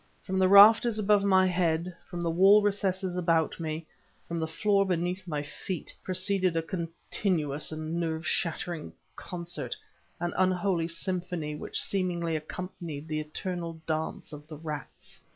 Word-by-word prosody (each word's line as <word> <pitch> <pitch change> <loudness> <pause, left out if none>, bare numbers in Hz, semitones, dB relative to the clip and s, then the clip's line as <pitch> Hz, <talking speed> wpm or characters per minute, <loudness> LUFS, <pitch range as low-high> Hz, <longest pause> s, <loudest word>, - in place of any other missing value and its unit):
From 190 0 -1
the 185 - +5
rafters 215 +3 +8
above 210 -1 +3
my 190 -1 +5
head, 175 -1 0
from 175 -1 -5
the 170 - 0
wall 195 +5 +6
recesses 190 -2 0
about 165 -3 +1
me, 160 0 -4 0.4
from 170 0 -3
the 160 - -1
floor 200 +4 +2
beneath 180 0 -2
my 150 -3 -2
feet, 160 +4 -6
proceeded 185 -1 +1
a 165 - 0
continuous 165 -3 -1
and 155 +2 -3
nerve 160 -1 -2
shattering 170 -1 -2 0.2
concert, 175 -1 -5 0.4
an 175 0 -2
unholy 185 -2 +1
symphony 175 -2 -3
which - - -4
seemingly 175 -4 0
accompanied 155 -1 -6
the 155 -1 -2
eternal 165 +2 -4
dance 155 0 -3
of 150 0 -10
the 155 -1 -9
rats. 150 -2 -8
175 Hz, 145 wpm, -29 LUFS, 160-185 Hz, 0.4 s, rafters